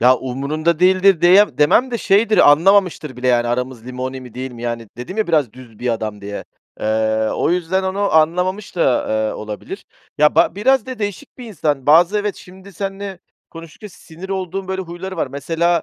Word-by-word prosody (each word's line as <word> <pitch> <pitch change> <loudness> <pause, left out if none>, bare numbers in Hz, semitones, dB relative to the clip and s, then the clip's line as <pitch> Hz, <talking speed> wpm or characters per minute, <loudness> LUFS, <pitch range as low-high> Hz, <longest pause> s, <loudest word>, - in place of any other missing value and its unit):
Ya, 125 +2 +5
umurunda 145 +6 -2
değildir 185 0 +4
deyem 190 +4 +5
demem 190 - +3
de 235 - -2
şeydir, 215 -4 +4
anlamamıştır 165 -3 +2
bile 125 +1 -1
yani 120 -1 +2
aramız 125 -1 -3
limoni 130 +1 -5
mi 125 -3 -13
değil 130 0 -6
mi? 120 0 -10
Yani 115 -2 -4
dedim 125 - -7
ya, 220 - 0
biraz 150 -9 +1
düz 120 -4 -15
bir 125 - -3
adam 110 -2 -5
diye. 100 +1 -7 0.4
Eee, 110 0 0
o - - 0
yüzden 180 +2 0
onu 195 +2 -1
anlamamış 180 +6 +1
da, 135 -7 +1
eee, 110 0 0
olabilir. 105 -1 -8 0.3
Ya, 150 0 +4
ba - - +3
biraz 250 +4 +2
da 255 -1 -7
değişik 205 -1 -6
bir 250 - -8
insan. 150 - -2
Bazı 175 +7 +5
evet, 205 -2 -3
şimdi 190 +2 -14
seninle 195 0 -5 0.3
konuştukça 165 +5 -11
sinir 175 0 -12
olduğum 190 0 -4
böyle 190 0 -2
huyları 185 +2 -8
var. 160 - -1
Mesela, 165 +5 -1
165 Hz, 185 wpm, -18 LUFS, 125-190 Hz, 0.4 s, Ya